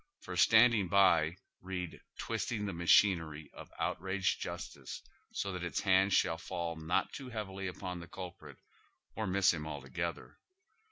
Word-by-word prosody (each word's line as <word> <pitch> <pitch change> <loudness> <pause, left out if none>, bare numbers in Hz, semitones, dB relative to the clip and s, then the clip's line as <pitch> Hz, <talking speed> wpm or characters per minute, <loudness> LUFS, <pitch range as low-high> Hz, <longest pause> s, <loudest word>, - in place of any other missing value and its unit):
For - - -7
standing 110 +2 +6
by, 85 -4 +4 0.3
read 90 -2 -5 0.2
twisting 110 -1 -2
the 100 - -3
machinery 85 -3 +3
of - - -11
outraged 95 +1 -1
justice - - -6 0.3
so 100 - -2
that 90 -1 -4
its 85 - -2
hand 95 0 +4
shall 80 -3 +2
fall 85 -1 -4
not 80 +2 -1
too 135 -3 -7
heavily 100 -4 -4
upon 90 0 -5
the 85 - -9
culprit, 90 -1 -9 0.6
or 110 0 -2
miss 95 0 +4
him 75 -2 -5
alto 70 -3 -7
gether. 85 +5 -4
90 Hz, 150 wpm, -33 LUFS, 85-100 Hz, 0.6 s, standing